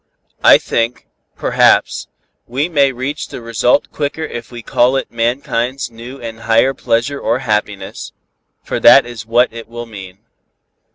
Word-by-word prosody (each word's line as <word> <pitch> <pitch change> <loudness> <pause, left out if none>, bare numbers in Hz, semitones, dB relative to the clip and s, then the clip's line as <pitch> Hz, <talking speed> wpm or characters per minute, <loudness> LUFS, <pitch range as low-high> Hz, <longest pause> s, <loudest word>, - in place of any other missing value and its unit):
I - - +8
think, 115 +1 -2 0.3
perhaps, - - +2 0.4
we 135 +6 -1
may 140 -5 +3
reach 130 +3 -4
the - - -8
result 115 +3 +1
quicker 150 +2 -3
if 120 -6 -7
we 120 -1 -9
call 125 +4 +2
it 135 - -2
mankind's 120 +1 -1
new 120 +4 -10
and 115 -1 -7
higher 115 +4 +2
pleasure 120 +3 -1
or - - 0
happiness, 105 -3 -3 0.5
for - - -3
that - - +7
is 120 -2 -9
what 120 +1 +2
it 115 -1 -9
will 120 0 -7
mean." 95 -4 -10
120 Hz, 150 wpm, -16 LUFS, 115-130 Hz, 0.5 s, I